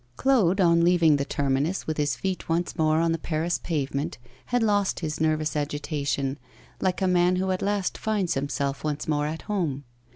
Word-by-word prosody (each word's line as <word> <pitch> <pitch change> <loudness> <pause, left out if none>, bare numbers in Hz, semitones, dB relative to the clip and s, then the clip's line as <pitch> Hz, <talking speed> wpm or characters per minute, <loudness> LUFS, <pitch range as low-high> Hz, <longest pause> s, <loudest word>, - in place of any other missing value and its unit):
Claude, 215 -9 +3
on 170 -2 +4
leaving 170 -4 +4
the 140 - -1
terminus, 140 +7 -1
with 155 - -3
his 145 -1 +1
feet 190 -3 -4
once 170 +2 0
more 155 0 +2
on 165 0 +2
the 165 - -1
Paris 165 +2 -1
pavement, 145 0 -2 0.3
had 245 -1 +1
lost 205 -4 +1
his 155 -2 -3
nervous 155 -1 +1
agitation, 145 -2 -2 0.4
like 190 0 0
a - - +3
man 180 0 +3
who 190 +1 0
at 185 - -1
last 200 -2 -1
finds 205 -6 0
himself 140 0 -2
once 150 -1 -2
more 150 -1 +1
at 160 +2 -5
home. 170 -10 -2
165 Hz, 185 wpm, -26 LUFS, 145-185 Hz, 0.4 s, on